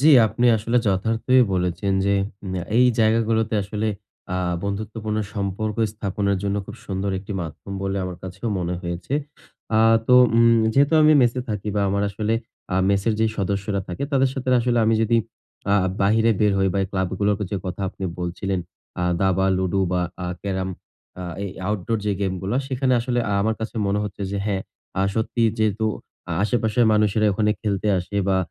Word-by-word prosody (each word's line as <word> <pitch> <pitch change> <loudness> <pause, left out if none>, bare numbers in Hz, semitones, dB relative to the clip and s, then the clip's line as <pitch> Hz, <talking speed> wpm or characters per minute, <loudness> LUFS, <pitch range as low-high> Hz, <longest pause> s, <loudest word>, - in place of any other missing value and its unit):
জি, 150 - +5 0.2
আপনি 120 +4 +1
আসলে 115 +3 -1
যথার্থই 115 +6 +3
বলেছেন 90 +2 0
যে 100 - +2 0.4
ম্যা 90 -2 -2 0.2
এই 125 - +6
জায়গাগুলোতে 110 0 +2
আসলে 105 +2 -3 0.5
আ - - 0 0.3
বন্ধুত্বপূর্ণ 110 +2 -3 0.2
সম্পর্ক 100 +1 -2 0.2
স্থাপনের 100 -1 -1
জন্য 100 0 -1
খুব - - -9
সুন্দর 95 0 -2
১টি 100 +2 -7
মাধ্যম 85 +4 -7
বলে 95 0 -1
আমার 90 -1 -5
কাছেও 95 +5 -5
মনে 90 0 -2
হয়েছে। 85 +8 -4 0.6
আ - - +5 0.3
তো 125 - +5 0.2
উম 115 0 +5
যেহেতু 140 +3 +3
আমি 155 0 +7
মেসে 120 +1 +2
থাকি 105 -1 -3
বা 100 - +2
আমার 100 +1 0
আসলে 110 +2 -1 0.4
আ - - +1 0.2
মেসের 100 +3 +2
যেই 110 -1 +2
সদস্যরা 100 0 -1
থাকে 90 +8 -5
তাদের 135 -1 +3
সাথের 130 -1 0
আসলে 120 0 +1
আমি 110 0 +3
যদি 115 +1 +2 0.6
আ - - +5 0.3
বাহিরে 110 +3 +3
বের 105 -1 +4
হই 95 0 +3
বা 100 - 0
এ - - -4
ক্লাব 95 -2 -1
গুলোরকে 105 0 +1
যে 100 - -1
কথা 90 +1 -5
আপনি 95 - -7
বলছিলেন 90 +2 -2 0.4
আ - - 0 0.2
দাবা, 95 0 +2
লুডু 95 +1 0
বা 90 - +1 0.2
আ - - -2 0.2
ক্যারাম 95 -2 -2 0.5
আ - - -4 0.2
এই 100 - -4 0.2
outdoor 105 +2 -1
যে 105 - +1
game 95 -1 -1
গুলা 100 +6 -1
সেখানে 130 -1 0
আসলে 120 +1 -1 0.2
আমার 110 +2 +1
কাছে 110 - -4
মনে 100 +1 +1
হচ্ছে 100 0 -6
যে, 100 - -2
হ্যাঁ, 95 -2 -1 0.4
আ - - +3
সত্যি 115 +1 -1 0.2
যেহেতু 110 0 +1 0.6
আশেপাশের 115 +1 +2
মানুষেরা 105 0 +2
ওখানে 105 +1 +1
খেলতে 105 -1 -1
আসে 95 +3 -6
বা 95 - +3
105 Hz, 180 wpm, -23 LUFS, 95-110 Hz, 0.6 s, আমি